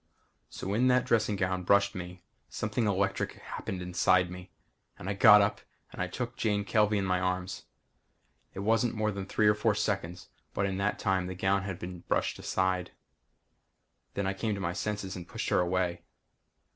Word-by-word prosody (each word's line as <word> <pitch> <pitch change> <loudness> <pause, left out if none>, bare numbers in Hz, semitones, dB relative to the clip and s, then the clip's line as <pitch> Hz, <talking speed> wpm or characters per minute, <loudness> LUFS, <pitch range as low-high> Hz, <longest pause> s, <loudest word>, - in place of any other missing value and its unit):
So - - -8
when 110 +6 +2
that 125 0 +4
dressing 115 -4 +2
gown 95 -1 -1
brushed 100 +2 +3
me, 90 -1 -8 0.3
something 110 +1 -1
electric 100 0 0
happened 90 -1 -6
inside 90 0 +2 0.7
and 90 - -8
I 100 - 0
got 105 +1 +8
up 100 - -1 0.3
and 90 0 -3
took 120 +2 -4
Jane 105 -2 0
Kelvey 105 -1 +3
in 100 - 0
my 90 -1 +1
arms. 90 0 -2 0.9
It 95 - -4
wasn't 115 +3 +2
more 110 0 0
than 100 -1 -5
three 105 +1 +2
or 105 - +6
four 105 +1 +1
seconds 95 -4 -2 0.3
but 100 - +1
in 95 -1 -2
that 100 +1 0
time 95 -3 0
the 95 - -5
gown 95 +2 +1
had 95 -2 -5
been 90 0 -7
brushed - - -1
aside. 95 -1 0 1.3
Then 100 - -1
I 95 - 0
came 105 +2 -2
to - - -6
my 85 -2 -2
senses 100 -1 -3
and 90 -1 -8
pushed - - -4
her - - +3
away. 90 0 0
95 Hz, 180 wpm, -30 LUFS, 90-105 Hz, 1.3 s, got